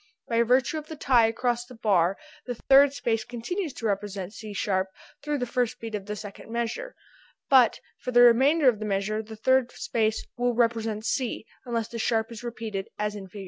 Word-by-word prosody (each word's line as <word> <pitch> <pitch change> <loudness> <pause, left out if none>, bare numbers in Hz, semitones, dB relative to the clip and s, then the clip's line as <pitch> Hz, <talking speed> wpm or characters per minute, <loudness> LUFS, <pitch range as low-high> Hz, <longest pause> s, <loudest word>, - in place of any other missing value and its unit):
By 230 0 +2
virtue 250 +6 +2
of 305 - -12
the 315 - -7
tie 250 -6 +4
across 240 +1 -1
the 250 - -12
bar 195 -5 +2 0.3
the 245 - -3
third 275 +4 +5
space 225 -5 -1
continues 305 - -4
to 230 - -7
represent 200 -2 -2
C 215 -1 -8
sharp 190 -1 0 0.3
thru 295 0 -1
the 250 - -1
first 245 -1 -1
beat 225 -1 -7
of 205 -2 -4
the 210 - -3
second 205 +1 -9
measure, 235 - -3 0.6
but 255 -4 +6 0.2
for - - -5
the 245 -1 +5
remainder 265 +6 +5
of 230 -5 +4
the 215 - -4
measure 210 +2 -1
the 220 0 -10
third 260 +2 +2
space 220 -1 -1
will 245 0 +1
represent 225 -2 0
C 250 -4 -2 0.2
unless 230 -2 -1
the 230 - -7
sharp 225 +1 0
is 230 +1 -8
repeated 220 -5 -5
as 210 0 -1
in 200 -2 -8
Fig. 200 +3 -10
230 Hz, 200 wpm, -26 LUFS, 215-250 Hz, 0.6 s, but